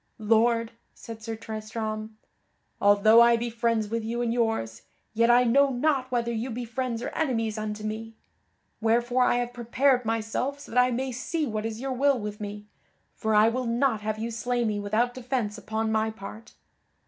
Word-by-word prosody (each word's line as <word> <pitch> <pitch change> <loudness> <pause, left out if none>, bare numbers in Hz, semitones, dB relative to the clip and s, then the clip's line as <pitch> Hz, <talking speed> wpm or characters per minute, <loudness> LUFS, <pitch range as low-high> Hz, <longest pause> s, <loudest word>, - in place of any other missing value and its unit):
"Lord," 230 +1 +2 0.2
said 225 -1 -10
Sir 225 0 -5
Tristram, 215 0 -5 0.6
"although 205 +3 +6
I 235 0 +6
be 235 0 -3
friends 230 -1 0
with 230 +1 -2
you 235 +2 -2
and 230 -1 0
yours, 225 - -1 0.3
yet 230 +1 +3
I 245 +1 +6
know 275 +4 +4
not 265 0 0
whether 235 -1 0
you 235 +3 -3
be 240 +1 -4
friends 240 0 -3
or - - -2
enemies 225 -8 -1
unto 215 -1 -4
me; 220 +1 -5 0.7
wherefore 240 +3 +2
I - - +3
have 245 0 -2
prepared 250 +2 +2
myself 225 +5 -2
so 285 - -12
that 250 +2 +5
I 250 - +3
may 255 +2 -2
see 300 +6 -2
what 215 -3 -2
is 225 0 -6
your 265 +1 -3
will 275 0 +2
with 210 0 -6
me, 205 0 -6 0.5
for 220 -1 -1
I 210 +1 +6
will 250 +1 -2
not 235 -1 +1
have 215 0 -2
you 230 +2 -3
slay 240 +1 -1
me 210 -2 -1
without 215 +4 0
defence 245 -4 -2
upon 220 0 -2
my 220 0 +1
part." 220 +1 -10
230 Hz, 185 wpm, -27 LUFS, 220-245 Hz, 0.7 s, although